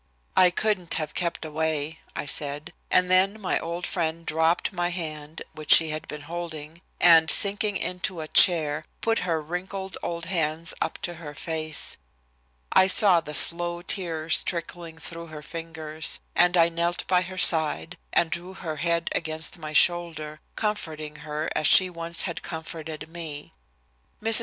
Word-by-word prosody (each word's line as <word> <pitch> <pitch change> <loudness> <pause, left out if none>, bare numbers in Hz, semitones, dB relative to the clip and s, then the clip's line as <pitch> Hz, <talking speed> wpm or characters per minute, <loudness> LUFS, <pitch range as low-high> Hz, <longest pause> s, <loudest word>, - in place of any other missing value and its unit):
"I 185 -1 +6
couldn't 185 -1 -1
have 155 -1 -3
kept 170 -2 -3
away," 155 0 -2 0.2
I - - -4
said, 145 +1 +1 0.2
and 180 0 +3
then 195 +3 +3
my 195 - -1
old 170 +2 -5
friend 165 -2 -3
dropped 160 +5 0
my 175 -1 -1
hand, 155 -3 -6
which 155 0 -4
she 160 -1 +7
had 155 0 -5
been 150 - -7
holding, 165 0 -7 0.2
and, 165 -2 +6
sinking 205 +1 +3
into 180 -1 -4
a 155 - -5
chair, 155 -3 +4 0.2
put 225 0 +1
her 170 -3 -1
wrinkled 185 +4 -6
old 170 -1 -4
hands 165 -2 -1
up - - -2
to 175 - -3
her 150 -2 -9
face. 155 -1 +1 0.7
I 190 - +5
saw 190 -2 +5
the 150 -1 -2
slow 175 +2 +5
tears 165 -4 0
trickling 170 -1 -5
through 170 +1 -7
her 155 -1 -10
fingers, 160 -1 -3 0.2
and 180 0 +4
I 165 -1 +6
knelt 170 +1 -2
by 180 -1 +2
her 185 +1 -7
side 155 - +2 0.2
and 165 - +2
drew 180 +2 -6
her 160 -5 -6
head 170 0 0
against 160 +2 -2
my 155 -1 -7
shoulder, 155 -2 +1 0.2
comforting 155 -8 -4
her 155 0 -5
as 155 - +1
she 185 -1 +6
once 170 0 -2
had 170 -4 -4
comforted 160 -2 -7
me. 160 - -8 0.7
Mrs. 225 +1 +8
165 Hz, 160 wpm, -25 LUFS, 155-175 Hz, 0.7 s, Mrs